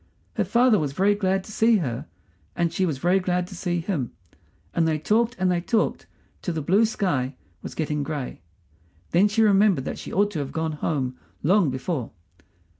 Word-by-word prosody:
Her -, -, +1 dB
father 240 Hz, -3 st, +4 dB
was 145 Hz, -3 st, -2 dB
very 195 Hz, +7 st, +3 dB
glad 190 Hz, -2 st, 0 dB
to 215 Hz, -, -11 dB
see 225 Hz, +1 st, +4 dB
her, 125 Hz, -, -3 dB, 0.5 s
and 170 Hz, -1 st, 0 dB
she 185 Hz, +2 st, +1 dB
was 150 Hz, -5 st, -2 dB
very 175 Hz, +6 st, +3 dB
glad 180 Hz, -1 st, 0 dB
to 185 Hz, -, -10 dB
see 175 Hz, -1 st, -1 dB
him, 160 Hz, -, -2 dB, 0.6 s
and 165 Hz, -1 st, +2 dB
they 155 Hz, -1 st, +1 dB
talked 225 Hz, +9 st, +1 dB
and 185 Hz, 0 st, +2 dB
they 175 Hz, -1 st, +1 dB
talked 220 Hz, +5 st, 0 dB, 0.3 s
till 175 Hz, -, -3 dB
the 155 Hz, -, -1 dB
blue 200 Hz, +9 st, +4 dB
sky 145 Hz, -, -1 dB, 0.3 s
was -, -, -8 dB
getting 150 Hz, -2 st, -1 dB
gray. 140 Hz, -, -4 dB, 0.7 s
Then 185 Hz, +5 st, +5 dB
she 220 Hz, +2 st, +2 dB
remembered 200 Hz, -8 st, +4 dB
that -, -, -4 dB
she -, -, -7 dB
ought 205 Hz, +2 st, +2 dB
to 165 Hz, -, -3 dB
have 140 Hz, -2 st, -4 dB
gone 160 Hz, 0 st, -1 dB
home 140 Hz, -4 st, -2 dB, 0.2 s
long 185 Hz, 0 st, +4 dB
before. 130 Hz, 0 st, -3 dB
175 Hz, 190 wpm, -25 LUFS, 150-205 Hz, 0.7 s, Then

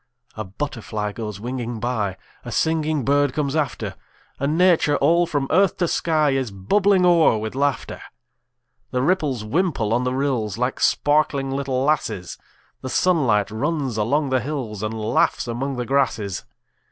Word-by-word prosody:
A 110 Hz, -, -4 dB
butterfly 105 Hz, -1 st, -4 dB
goes 105 Hz, -2 st, -6 dB
winging 120 Hz, 0 st, -4 dB
by; 110 Hz, -5 st, -2 dB, 0.3 s
A -, -, -7 dB
singing 155 Hz, -4 st, 0 dB
bird 145 Hz, -1 st, +2 dB
comes 145 Hz, -1 st, -1 dB
after; 150 Hz, -2 st, -2 dB, 0.5 s
And 145 Hz, +4 st, 0 dB
Nature, 170 Hz, -5 st, +4 dB
all 170 Hz, +4 st, +3 dB
from 145 Hz, -3 st, -1 dB
earth 190 Hz, +2 st, +3 dB
to 175 Hz, -, +1 dB
sky, 155 Hz, -3 st, +1 dB
Is 135 Hz, -3 st, -1 dB
bubbling 185 Hz, -, +2 dB
o'er 170 Hz, -9 st, +5 dB
with 110 Hz, 0 st, -4 dB
laughter. 140 Hz, +1 st, -1 dB, 0.9 s
The 125 Hz, 0 st, -1 dB
ripples 150 Hz, -, 0 dB
wimple 135 Hz, -, 0 dB
on 120 Hz, +2 st, +1 dB
the 125 Hz, 0 st, -1 dB
rills, 125 Hz, -7 st, -1 dB
Like 125 Hz, +2 st, -1 dB
sparkling 145 Hz, -2 st, +2 dB
little 135 Hz, -1 st, -1 dB
lasses; 135 Hz, -, -1 dB, 0.4 s
The 130 Hz, -, -5 dB
sunlight 125 Hz, -, +2 dB
runs 135 Hz, +2 st, -2 dB
along 135 Hz, +7 st, 0 dB
the 130 Hz, -, +3 dB
hills, 125 Hz, -7 st, -4 dB
And 110 Hz, 0 st, -2 dB
laughs 110 Hz, +3 st, +1 dB
among 130 Hz, +4 st, -3 dB
the 125 Hz, -1 st, -3 dB
grasses. 115 Hz, -8 st, 0 dB
135 Hz, 155 wpm, -22 LUFS, 115-150 Hz, 0.9 s, o'er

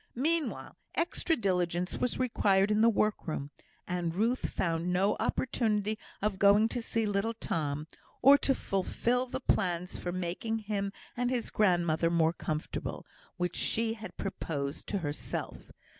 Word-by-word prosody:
Meanwhile, 320 Hz, +4 st, 0 dB, 0.2 s
extra 335 Hz, 0 st, +1 dB
diligence 180 Hz, -, 0 dB
was 250 Hz, -, -1 dB
required 205 Hz, -5 st, +3 dB
in 210 Hz, +1 st, +3 dB
the 230 Hz, -, +7 dB
workroom; 170 Hz, -10 st, -1 dB, 0.4 s
and 175 Hz, -2 st, -2 dB
Ruth 230 Hz, +6 st, +1 dB
found 170 Hz, 0 st, -1 dB
no 195 Hz, +3 st, +2 dB
opportunity 215 Hz, -4 st, 0 dB, 0.2 s
of 205 Hz, -3 st, 0 dB
going 205 Hz, +2 st, +6 dB
to 245 Hz, -, -2 dB
see 225 Hz, -1 st, 0 dB
little 205 Hz, +2 st, 0 dB
Tom, 150 Hz, -7 st, -2 dB, 0.3 s
or 275 Hz, +2 st, +8 dB
to 270 Hz, -, +2 dB
fulfil 240 Hz, +6 st, 0 dB
the 250 Hz, -, -3 dB
plans 180 Hz, -7 st, 0 dB
for 175 Hz, -, -3 dB
making 185 Hz, +5 st, -2 dB
him 200 Hz, -1 st, -1 dB, 0.2 s
and 245 Hz, 0 st, 0 dB
his 250 Hz, -2 st, -1 dB
grandmother 175 Hz, -5 st, +2 dB
more 165 Hz, -1 st, +3 dB
comfortable, 155 Hz, -2 st, -4 dB, 0.3 s
which 180 Hz, -1 st, -1 dB
she 225 Hz, 0 st, +1 dB
had 220 Hz, -1 st, -9 dB
proposed 145 Hz, -7 st, -4 dB
to 205 Hz, -, -1 dB
herself. 150 Hz, -5 st, -4 dB
200 Hz, 145 wpm, -31 LUFS, 175-230 Hz, 0.4 s, or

